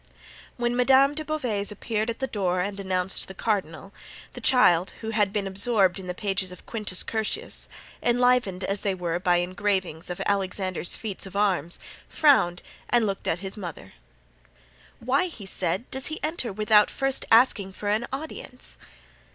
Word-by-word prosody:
When 240 0 0
Madame 265 +3 +5
de 310 +1 -4
Beauvais 250 -10 -2
appeared 215 +1 -2
at 230 - -3
the 265 - -1
door 185 -7 -1
and 200 +2 -2
announced 185 -1 0
the 190 - -9
cardinal, 195 -3 -2 0.4
the - - -8
child, 185 -9 +4
who 220 0 -3
had 210 -3 +2
been 205 -1 -1
absorbed 195 -1 +3
in 185 - -8
the 180 - -4
pages 190 -1 -2
of 180 - -12
Quintus 210 -5 -2
Curtius, 220 -1 -3 0.3
enlivened 245 -6 +2
as 195 +1 -2
they 195 -2 0
were 175 -1 -2
by 180 -1 +3
engravings 185 -2 -1
of 180 - -4
Alexander's 190 -2 -1
feats 200 -3 -5
of 190 - -12
arms, 185 -5 +1 0.3
frowned 220 - +3 0.3
and 240 -2 +3
looked 195 -2 -3
at 165 - 0
his 190 - -5
mother. 170 - -8 1.1
"Why," 270 +9 +1
he 230 - -9
said, 190 +1 0
"does 265 +1 -2
he 315 - -4
enter 305 -7 -2
without 210 +1 +4
first 270 -1 -1
asking 225 -5 +4
for 205 - -6
an 215 +3 +1
audience?" 270 -2 -7
205 Hz, 165 wpm, -26 LUFS, 185-240 Hz, 1.1 s, Madame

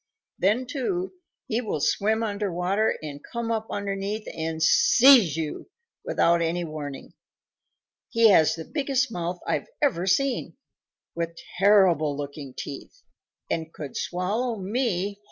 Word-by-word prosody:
Then, 215 +7 +2
too, 355 +9 -3 0.3
he 230 +2 -1
will 210 -9 -3
swim 220 +9 +1
under 205 -2 -2
water 185 +5 0
and 145 -1 -7
come 235 -1 -3
up 220 -1 -2
underneath 200 +1 -3
and 160 0 -2
seize 235 - +6
you 160 - -4 0.3
without 170 - +2
any 170 +1 0
warning. 150 -4 -7 1.0
He 230 -1 +5
has 160 -6 +5
the 165 -1 -7
biggest 270 -4 -1
mouth 175 -2 -3
I've - - -1
ever 195 - +1
seen, 255 +6 0 0.6
with 170 0 -4 0.2
terrible 180 -8 +4
looking 140 -2 -7
teeth, 145 - -8 0.4
and 160 -1 -3
could 145 -4 -8
swallow 215 +7 -2
me 200 -1 -1
whole." 200 0 -4
195 Hz, 135 wpm, -25 LUFS, 165-230 Hz, 1.0 s, seize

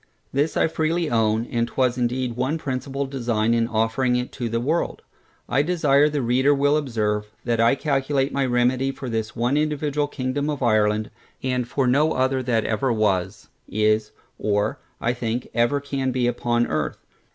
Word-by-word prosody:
This 145 +4 +1
I - - +4
freely 160 +1 -1
own, 110 0 +2
and 120 -1 -1
was 130 -2 +2
indeed 125 0 -1
one 130 +6 0
principal 135 -1 -3
design 120 -4 0
in 115 -1 +2
offering 115 +3 +1
it 125 0 -2
to 120 -3 -4
the 115 +1 0
world. 155 +8 -1 0.4
I 135 - +2
desire 150 -3 +3
the 145 -3 -1
reader 130 +4 +3
will 145 +1 +3
observe, 105 -7 -1 0.2
that 120 -2 0
I 115 +3 +4
calculate 140 -1 0
my 140 - +1
remedy 125 +2 +1
for 135 -1 -7
this 110 -1 -3
one 120 +4 +1
individual 150 -1 0
Kingdom 140 +2 -2
of 145 -3 -2
Ireland, 110 -2 +2 0.3
and 125 -2 -1
for 135 +1 0
no 145 +5 +3
other 130 0 +1
that 120 -3 0
ever 120 +4 0
was, 105 -5 0 0.2
is, 110 0 +1 0.3
or, 105 -1 0 0.2
I 120 - 0
think, 120 0 -3
ever 120 +4 +2
can 135 -2 -2
be 125 -1 0
upon 120 0 +1
Earth. - - -2
125 Hz, 175 wpm, -23 LUFS, 115-140 Hz, 0.4 s, I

